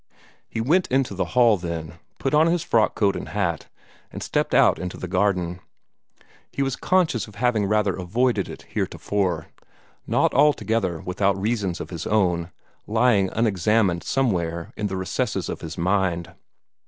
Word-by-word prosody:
He 110 - -3
went 170 +10 +2
into 130 0 +1
the - - -1
hall 115 -4 +6
then, 85 -2 -6 0.2
put 135 - -2
on 155 +2 +5
his 170 0 +1
frock 110 -9 +2
coat 100 -3 +2
and - - -6
hat, 95 -6 -2 0.4
and - - -6
stepped - - 0
out - - +5
into 90 0 -5
the 90 - -5
garden. 90 -2 0 0.9
He 140 - -1
was 135 -2 -1
conscious 170 -12 +1
of 105 - -14
having 110 -2 +1
rather 105 -2 +1
avoided 105 +3 0
it - - -9
heretofore 90 -6 -2 0.6
not - - +2
altogether 110 - +2
without 95 +1 0
reasons 100 -4 -1
of - - -7
his 85 -1 -5
own, 90 -5 +1 0.4
lying 110 -3 +3
unexamined 105 -4 +1
somewhere 85 -10 -1
in 105 - -2
the 95 -1 -4
recesses 95 +1 -2
of - - -5
his 80 0 -7
mind. 90 -1 0
100 Hz, 155 wpm, -23 LUFS, 90-115 Hz, 0.9 s, hall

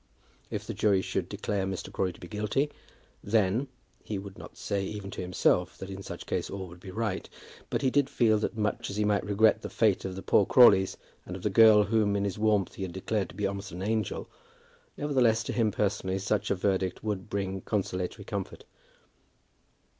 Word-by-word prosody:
If - - -4
the - - -4
jury 100 -3 +2
should 95 -2 -2
declare 100 -1 -2
Mr. 95 -1 -5
Crawley 90 -2 0
to - - -17
be 90 - -9
guilty, 105 +9 -1 0.5
then; 110 +4 +2 0.4
he 105 - -4
would 95 0 -8
not - - -12
say 100 -1 -2
even 100 0 -5
to - - -5
himself 90 0 +1
that 95 0 -7
in 95 0 -6
such - - -8
case - - -2
all 95 -1 -5
would 85 +1 -13
be 95 - -10
right, 105 0 -3 0.4
but - - -1
he 130 - +3
did 140 0 +2
feel 110 -3 +3
that 110 - -3
much 105 -1 -1
as 100 - -5
he 105 - +2
might 105 -1 +2
regret 110 +2 +3
the - - -5
fate 105 -4 +2
of 95 -1 -4
the 95 - -7
poor 100 - +4
Crawleys, 100 -7 +6 0.3
and 90 - -7
of 90 - -8
the 105 - +1
girl 110 0 +7
whom 105 0 +2
in 100 - 0
his 100 +1 -2
warmth 105 -3 +2
he - - -9
had 95 -2 -4
declared 95 +1 -2
to - - -12
be 105 - -1
almost 100 0 -4
an 90 +3 -6
angel, 110 +1 -1 0.7
nevertheless 125 -6 +2
to - - -4
him 115 -3 +2
personally 95 -2 -1
such 100 +1 -1
a - - +2
verdict 95 -1 -1
would 105 -2 -3
bring 95 -2 -2
consolatory 95 0 -3
comfort. 100 -3 -5
100 Hz, 205 wpm, -29 LUFS, 95-110 Hz, 0.7 s, girl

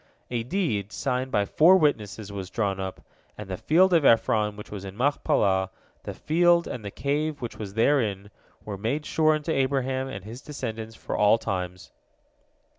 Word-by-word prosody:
A 120 -2 -1
deed, 115 - -2
signed 130 +1 -2
by 105 -6 +1
four 170 - +6
witnesses, 110 - -1
was 95 -2 -6
drawn 100 -4 -1
up, 95 -1 -5 0.4
and 105 - -7
the 95 - -3
field 180 - +3
of 165 -3 +4
Ephron, 110 -3 +3
which 105 - -11
was 100 -2 -6
in 95 0 -8
Machpelah, 100 -8 +1 0.4
the - - -5
field, 170 +1 +3
and 120 - -6
the 100 - -5
cave 145 +6 -2
which 120 -3 -6
was 100 -2 -7
therein, 110 -6 +1 0.3
were 100 -2 -6
made 140 +9 -2
sure 155 0 +3
unto 155 +2 -3
Abraham 135 -1 0
and 100 -8 -7
his 115 +4 -9
descendants 115 -6 -6
for - - -5
all 105 +2 +5
times. 90 -4 -5
115 Hz, 175 wpm, -26 LUFS, 100-145 Hz, 0.4 s, four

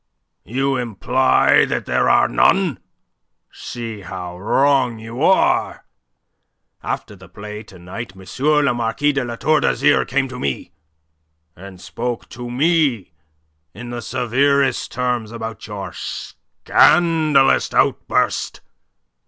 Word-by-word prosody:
"You 135 +5 0
imply 125 +2 +2
that - - -3
there 65 0 +1
are - - +4
none? - - +2 0.7
See 115 -3 -7
how 90 0 -7
wrong 130 +3 +2
you 115 +4 -8
are. 190 +4 +2 1.0
After - - -5
the - - -16
play 105 +1 -8
to 100 -4 -15
night 95 +5 -8
M. 95 0 -14 0.4
le 140 - +2
Marquis 120 +5 0
de 140 -2 -1
La 120 -1 -5
Tour 155 +5 +2
d'Azyr 145 - +2
came 135 +1 0
to 125 -1 -8
me, 70 -2 -3 0.8
and 95 0 -12
spoke 120 +4 -5
to 120 0 -8
me 135 - +1 0.6
in 120 +3 -8
the 120 -1 -5
severest 135 +4 0
terms 125 -3 -2
about 115 -1 -7
your 100 -2 -7
scandalous 155 -5 +2
outburst. - - 0
120 Hz, 120 wpm, -19 LUFS, 105-135 Hz, 1.0 s, are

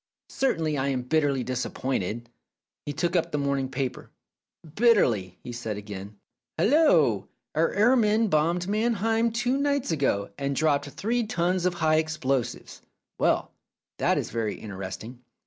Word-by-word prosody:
Certainly 160 - 0
I 135 - 0
am 130 -2 -1
bitterly 140 -2 +1
disap 130 -1 -3
pointed." 120 -2 -2 0.6
He - - -1
took 170 +4 -1
up 170 -1 +1
the 150 - -1
morning 140 -2 0
paper. 130 -1 -4 0.6
"Bitterly!" 120 - +3
he 125 - -6
said 115 -3 -4
again. 100 0 -8 0.4
"Hallo! 180 - +4 0.3
Our 160 +2 +2
air 220 +6 +4
men 220 -1 +3
bombed 170 +2 +1
Mannheim 225 +2 +1
two 245 +3 0
nights 280 -6 0
ago, 130 -11 0
and 140 0 -1
dropped 145 -1 +1
three 230 - -1
tons 180 -1 +1
of 180 - -1
high 155 -2 +2
explosives. 135 -6 -2 0.4
Well, - - +1 0.5
that - - +2
is - - -3
very 115 -2 -2
interesting. 105 +4 -7
150 Hz, 145 wpm, -26 LUFS, 125-205 Hz, 0.6 s, Hallo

